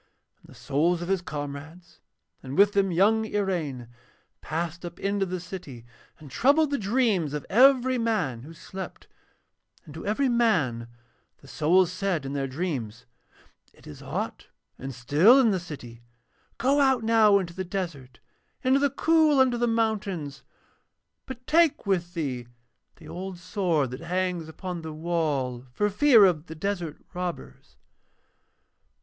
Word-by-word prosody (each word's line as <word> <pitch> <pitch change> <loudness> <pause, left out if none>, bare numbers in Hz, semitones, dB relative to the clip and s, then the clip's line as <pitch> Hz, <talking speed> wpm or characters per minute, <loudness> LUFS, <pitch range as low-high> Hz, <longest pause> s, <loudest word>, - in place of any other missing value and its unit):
And - - -21
the - - -16
souls 170 +5 0
of 175 - -6
his 195 -2 +1
comrades, 155 +2 -8 0.4
and 135 +1 -7
with 205 +1 +5
them 195 -1 +2
young 210 +6 +3
Iraine, 175 - -2 0.5
passed 170 +2 -4
up 175 0 -8
into 200 -1 -1
the 180 0 -4
city 165 -9 -9 0.3
and 150 -4 -14
troubled 285 - +3
the 280 - 0
dreams 200 - +1
of 150 - -5
every 255 +1 +5
man 180 - -1
who 150 +6 -11
slept, 185 +3 -9 0.8
and 150 - -12
to 160 - -8
every 220 +7 0
man 165 - +1 0.5
the 140 - -16
souls 170 +6 +2
said 185 -5 -2
in 135 - -5
their 135 -1 -2
dreams: 130 - -4 0.7
'It - - -21
is 75 - -11
hot - - -5 0.3
and 135 -1 -6
still 150 - +5
in 235 -5 +4
the 190 - 0
city. 125 -9 -10 0.6
Go 270 +5 +2
out 265 -4 +3
now 220 -2 +5
into 180 -3 -3
the 190 +1 -4
desert, 165 - -5 0.5
into 260 +2 +3
the 285 0 +2
cool 310 +1 +3
under 260 -2 +4
the 240 - +1
mountains, 205 -10 -2 0.9
but 255 -1 -9
take 330 -4 +3
with 175 -3 -1
thee 130 -7 -3 0.5
the 160 - -15
old 185 +2 -6
sword 175 - -1
that 125 +4 -7
hangs 180 -1 -2
upon 175 +1 -6
the 160 -1 -7
wall 150 -7 -2
for 205 +11 0
fear 230 -1 +6
of 170 -3 0
the 160 - -8
desert 175 -3 -4
robbers.' 180 -1 -6
180 Hz, 150 wpm, -26 LUFS, 150-215 Hz, 0.9 s, fear